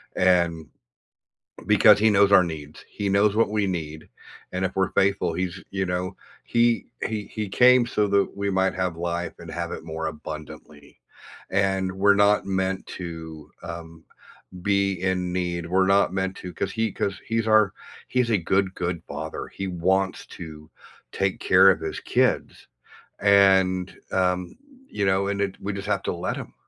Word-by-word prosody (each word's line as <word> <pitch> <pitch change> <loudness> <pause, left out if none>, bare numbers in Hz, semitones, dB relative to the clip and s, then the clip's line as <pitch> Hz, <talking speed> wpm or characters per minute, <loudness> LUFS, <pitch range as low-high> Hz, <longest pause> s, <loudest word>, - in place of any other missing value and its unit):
and 85 -4 +2 1.0
because - - +6
he 110 +1 +4
knows 100 0 +4
our 95 - +8
needs. 75 -3 -8
He 100 -1 -4
knows 100 +1 +3
what 115 -2 +3
we 105 -2 0
need, 80 -4 -5 0.4
and 90 +1 -2
if 95 - -2
we're 95 -1 +1
faithful, 95 -4 +1
he's 95 +1 -3
you 95 -1 -1
know, 90 +1 -3 0.3
he 120 0 +2 0.2
he 105 -2 -3
he 105 -3 -5
came 125 +1 +5
so 105 -3 0
that 100 0 +1
we 100 0 -2
might 95 0 +1
have 90 -3 -2
life, 85 0 -3
and - - -10
have - - -4
it - - -7
more 80 0 -4
abundantly, 75 -1 -10 0.5
and 95 -1 0
we're 100 +1 +4
not 100 0 +3
meant 95 0 -1
to, 80 -4 -8
um, 80 -1 -9 0.6
be 100 -1 +2
in 90 -1 -1
need, 85 -2 -2
we're 95 +2 +2
not 100 -1 +3
meant 95 0 -2
to 90 -1 -8
'cause 95 - -3
he 115 0 -1
'cause 100 - -2
he's 115 0 0
our 110 -2 +4 0.3
he's 125 -2 0
a 105 - +4
good, 95 +2 0
good 85 -1 -3
Father. - - -6
He 95 -1 -5
wants 95 +2 0
to 75 -1 -11 0.4
take 95 -1 -1
care - - +6
of - - -2
his - - -4
kids, - - 0 0.5
and, 95 -2 +4 0.2
um, 90 - 0 0.3
you 100 -1 -2
know, 95 +1 +2
and 100 0 -2
it 95 -1 -2
we 100 0 -3
just 100 +1 -6
have 105 -1 0
to - - -2
let 85 +1 -3
him. - - -8
95 Hz, 170 wpm, -24 LUFS, 85-100 Hz, 1.0 s, our